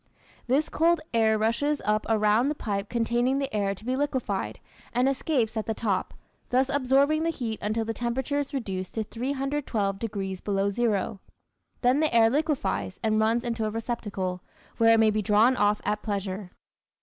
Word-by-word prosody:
This 275 Hz, +5 st, +2 dB
cold 335 Hz, +1 st, +2 dB
air 220 Hz, -1 st, +3 dB
rushes 235 Hz, +7 st, +1 dB
up 215 Hz, 0 st, +1 dB
around 220 Hz, +4 st, +3 dB
the 300 Hz, -, -1 dB
pipe 200 Hz, -5 st, -3 dB
containing 240 Hz, +3 st, +1 dB
the 275 Hz, -5 st, -2 dB
air 200 Hz, -1 st, 0 dB
to 215 Hz, -, -15 dB
be 255 Hz, +1 st, 0 dB
liquefied 245 Hz, -, -2 dB, 0.3 s
and 250 Hz, +2 st, +2 dB
escapes 260 Hz, -5 st, 0 dB
at 220 Hz, -, -2 dB
the 220 Hz, -, -1 dB
top, 200 Hz, -5 st, -1 dB, 0.3 s
thus 260 Hz, +2 st, +2 dB
absorbing 280 Hz, +3 st, +3 dB
the 330 Hz, -, +1 dB
heat 235 Hz, -9 st, -3 dB
until 220 Hz, +2 st, -1 dB
the 225 Hz, -, -2 dB
temperature 250 Hz, +5 st, -1 dB
is 285 Hz, -1 st, -3 dB
reduced 195 Hz, -9 st, -4 dB
to 220 Hz, -, 0 dB
312 255 Hz, -4 st, -2 dB
degrees 195 Hz, -4 st, -4 dB
below 200 Hz, 0 st, 0 dB
zero. 215 Hz, -2 st, 0 dB, 0.6 s
Then 250 Hz, +3 st, +3 dB
the 310 Hz, -1 st, +2 dB
air 225 Hz, -1 st, +5 dB
liquefies 280 Hz, -, -1 dB
and 215 Hz, -1 st, +2 dB
runs 225 Hz, +2 st, +2 dB
into 230 Hz, -2 st, -2 dB
a -, -, 0 dB
receptacle, 205 Hz, -5 st, -3 dB, 0.4 s
where 225 Hz, 0 st, +6 dB
it -, -, +3 dB
may 220 Hz, -1 st, +5 dB
be 215 Hz, 0 st, 0 dB
drawn 215 Hz, +5 st, +4 dB
off 205 Hz, -2 st, +2 dB
at 210 Hz, 0 st, 0 dB
pleasure. 195 Hz, -2 st, -3 dB
225 Hz, 175 wpm, -27 LUFS, 210-265 Hz, 0.6 s, where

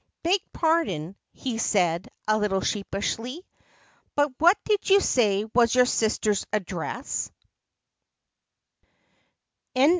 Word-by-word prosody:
"Beg 360 Hz, +4 st, +3 dB
pardon," 250 Hz, -, 0 dB, 0.2 s
he 240 Hz, -4 st, -4 dB
said, 180 Hz, -5 st, +1 dB, 0.2 s
a 215 Hz, -, +3 dB
little 210 Hz, -3 st, 0 dB
sheepishly, 225 Hz, -, -3 dB, 0.7 s
"but 290 Hz, -1 st, +2 dB
what 350 Hz, +5 st, +6 dB
did 420 Hz, -2 st, 0 dB
you 395 Hz, +1 st, +7 dB
say 210 Hz, -, +2 dB
was 235 Hz, 0 st, +4 dB
your 250 Hz, 0 st, +6 dB
sister's 215 Hz, -3 st, +1 dB
address 205 Hz, -, -3 dB
225 Hz, 95 wpm, -25 LUFS, 195-300 Hz, 0.7 s, you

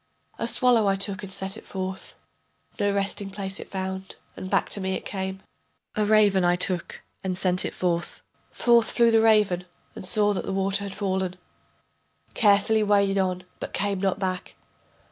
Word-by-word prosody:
A -, -, -1 dB
swallow 245 Hz, -5 st, +3 dB
I 195 Hz, -, +3 dB
took 195 Hz, 0 st, -1 dB
and 195 Hz, -2 st, -8 dB
sent 190 Hz, +2 st, -4 dB
it -, -, -11 dB
forth, 190 Hz, 0 st, -6 dB, 0.6 s
No 205 Hz, 0 st, +2 dB
resting 200 Hz, 0 st, -1 dB
place 195 Hz, -1 st, -4 dB
it -, -, -9 dB
found, 190 Hz, 0 st, -5 dB, 0.2 s
and 185 Hz, -, -7 dB
back -, -, +2 dB
to 200 Hz, -, -2 dB
me 190 Hz, 0 st, -1 dB
it -, -, -6 dB
came. 190 Hz, -1 st, -4 dB, 0.5 s
A 215 Hz, -, +1 dB
raven 205 Hz, -3 st, +4 dB
I 175 Hz, 0 st, +4 dB
took 180 Hz, -1 st, 0 dB, 0.2 s
and 185 Hz, -1 st, -2 dB
sent 185 Hz, -1 st, +3 dB
it -, -, -4 dB
forth, 170 Hz, -2 st, -2 dB, 0.3 s
Forth 235 Hz, -2 st, +3 dB
flew 235 Hz, -1 st, +3 dB
the 225 Hz, 0 st, +5 dB
raven 210 Hz, -5 st, +3 dB, 0.3 s
and -, -, -8 dB
saw 205 Hz, +2 st, +2 dB
that 190 Hz, -, -3 dB
the 195 Hz, -, -2 dB
water 195 Hz, +1 st, 0 dB
had 195 Hz, -, -6 dB
fallen, 190 Hz, -2 st, -1 dB, 1.0 s
Carefully 210 Hz, +1 st, +4 dB
waded 200 Hz, -1 st, +3 dB
on 185 Hz, -1 st, -1 dB, 0.2 s
but -, -, -6 dB
came 200 Hz, -1 st, 0 dB
not 195 Hz, -2 st, +1 dB
back. 185 Hz, -2 st, -3 dB
195 Hz, 180 wpm, -25 LUFS, 190-205 Hz, 1.0 s, the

